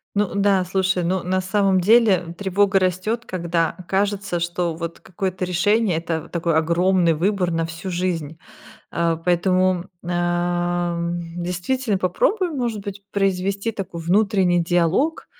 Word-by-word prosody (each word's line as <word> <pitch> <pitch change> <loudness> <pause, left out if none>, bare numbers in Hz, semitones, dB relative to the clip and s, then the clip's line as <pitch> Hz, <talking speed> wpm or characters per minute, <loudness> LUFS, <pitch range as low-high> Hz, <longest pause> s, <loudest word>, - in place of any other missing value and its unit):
Ну 205 -3 +1
да, 200 -2 +2
слушай, 185 0 0
ну, 185 +2 0
на 185 +1 0
самом 190 0 +2
деле, 190 -4 +4
тревога 195 0 +2
растёт, 185 +6 -1
когда 170 -2 -1
кажется, 195 -2 0
что 170 0 -2
вот 170 0 -6
какое-то 185 0 -3
решение- 185 +1 +2
это 165 -1 -2
в - - -14
такой 170 -1 -1
огромный 170 +2 +3
выбор 180 +2 0
на 165 0 0
всю 165 +3 -6
жизнь. 170 -3 -2 0.5
А, 170 -1 0
поэтому, 180 +1 +1 0.2
ам, 175 0 -1 0.2
действительно 200 +6 -1
попробуй, 350 - +1
может 240 -8 -2
быть, 200 0 -7
произвести 195 +2 0
такой 190 -4 -6
внутренний 185 -1 +2
диалог 175 - +1
185 Hz, 135 wpm, -22 LUFS, 170-195 Hz, 0.5 s, деле